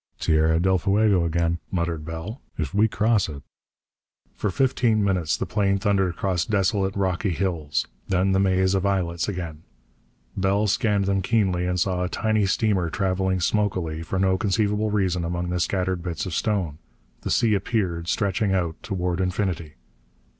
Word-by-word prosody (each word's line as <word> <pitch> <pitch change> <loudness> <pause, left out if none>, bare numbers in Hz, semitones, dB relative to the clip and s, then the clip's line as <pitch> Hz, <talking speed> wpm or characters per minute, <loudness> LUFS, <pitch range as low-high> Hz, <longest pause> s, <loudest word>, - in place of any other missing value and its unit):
"Tierra 80 +1 +3
del 95 +1 +2
Fuego 100 -1 +3
again," 85 0 0
muttered 85 -3 -2
Bell. 85 - -6 0.2
"If 75 -5 -3
we 105 +2 +4
cross 110 -3 +1
it...." 70 -2 -8 0.9
For 105 - -1
fifteen 120 -1 +2
minutes 90 -6 +1
the - - -2
plane 100 -2 +1
thundered 95 -1 +1
across 90 0 -1
desolate, 95 -2 0
rocky 95 +1 0
hills. 85 -4 -1 0.2
Then 95 +1 +2
the 95 - +3
maze 95 -1 +2
of 95 -1 +1
islets 90 -4 0
again. 85 -5 -5 0.7
Bell 100 +2 +1
scanned 105 -1 +1
them 95 0 +1
keenly, 95 -4 +1
and 90 0 0
saw 90 0 0
a 90 - -2
tiny 110 -1 +1
steamer 95 -4 +1
traveling 95 +1 0
smokily, 90 -6 0
for 85 +3 -3
no 95 0 +2
conceivable 105 +1 +1
reason, 95 -4 0
among 85 +1 -2
the 90 - -1
scattered 90 0 0
bits 90 +3 -3
of 90 - -5
stone. 90 -8 -1 0.4
The - - -4
sea 115 -2 +3
appeared, 95 -5 -1
stretching 100 0 +1
out 85 -3 -2
toward 90 -2 -2
infinity. 90 -4 -2
95 Hz, 160 wpm, -24 LUFS, 85-100 Hz, 0.9 s, we